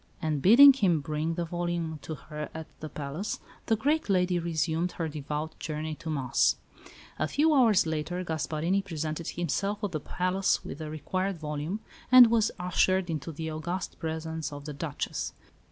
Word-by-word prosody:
And 155 Hz, -4 st, -1 dB
bidding 265 Hz, -, +9 dB
him 190 Hz, -, +2 dB
bring 155 Hz, +2 st, -2 dB
the 170 Hz, 0 st, -2 dB
volume 170 Hz, -2 st, -3 dB
to 160 Hz, -, -5 dB
her 150 Hz, +1 st, -7 dB
at 160 Hz, 0 st, -5 dB
the 155 Hz, -, -6 dB
palace, 150 Hz, +9 st, -4 dB, 0.3 s
the 225 Hz, -, +4 dB
great 290 Hz, +5 st, 0 dB
lady 180 Hz, -2 st, +2 dB
resumed 165 Hz, +1 st, -1 dB
her 165 Hz, -, -2 dB
devout 150 Hz, +1 st, -5 dB
journey 155 Hz, 0 st, -4 dB
to 160 Hz, +1 st, -7 dB
Mass. 135 Hz, -5 st, +2 dB, 0.6 s
A 155 Hz, -, +1 dB
few 305 Hz, -, +3 dB
hours 230 Hz, -, +5 dB
later 160 Hz, +3 st, -2 dB
Gasparini 165 Hz, +3 st, -1 dB
presented 160 Hz, -2 st, -4 dB
himself 200 Hz, +5 st, -2 dB
at 205 Hz, -, -1 dB
the 155 Hz, -, -2 dB
palace 185 Hz, +5 st, 0 dB
with 145 Hz, -, -7 dB
the 155 Hz, -1 st, -5 dB
required 185 Hz, +5 st, -2 dB
volume, 155 Hz, +6 st, -4 dB, 0.3 s
and 250 Hz, -3 st, +10 dB
was 230 Hz, -2 st, +3 dB
ushered 180 Hz, 0 st, +2 dB
into 155 Hz, +1 st, -4 dB
the 160 Hz, +1 st, -5 dB
august 175 Hz, +4 st, -4 dB
presence 160 Hz, -1 st, -4 dB
of 145 Hz, 0 st, -8 dB
the 150 Hz, -, -5 dB
Duchess. 145 Hz, 0 st, -4 dB
165 Hz, 170 wpm, -28 LUFS, 155-185 Hz, 0.6 s, and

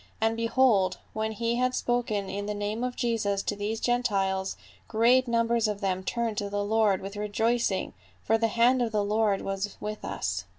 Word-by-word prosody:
And 225 Hz, +1 st, +1 dB
behold, 230 Hz, -5 st, +3 dB, 0.2 s
when 220 Hz, 0 st, -2 dB
we 235 Hz, 0 st, 0 dB
had 255 Hz, 0 st, +1 dB
spoken 240 Hz, -5 st, -1 dB
in 200 Hz, +1 st, -4 dB
the 210 Hz, -, -2 dB
name 205 Hz, +3 st, -3 dB
of 250 Hz, 0 st, -2 dB
Jesus 210 Hz, -4 st, 0 dB
to 205 Hz, -, -2 dB
these 210 Hz, +2 st, -3 dB
Gentiles, 195 Hz, -6 st, 0 dB, 0.3 s
great 245 Hz, +3 st, +4 dB
numbers 230 Hz, -1 st, +2 dB
of 210 Hz, -1 st, -2 dB
them 190 Hz, -2 st, -1 dB
turned 230 Hz, 0 st, -1 dB
to 200 Hz, -, -3 dB
the 205 Hz, 0 st, -1 dB
Lord 210 Hz, -2 st, +2 dB
with 195 Hz, +1 st, -6 dB
rejoicing, 210 Hz, 0 st, 0 dB, 0.3 s
for 225 Hz, +1 st, +2 dB
the 225 Hz, -, +3 dB
hand 240 Hz, +3 st, +3 dB
of 235 Hz, -2 st, 0 dB
the 210 Hz, -1 st, +1 dB
Lord 210 Hz, -1 st, +1 dB
was 195 Hz, +1 st, -3 dB
Avith 210 Hz, 0 st, -5 dB
us. -, -, -3 dB
220 Hz, 185 wpm, -28 LUFS, 205-235 Hz, 0.3 s, great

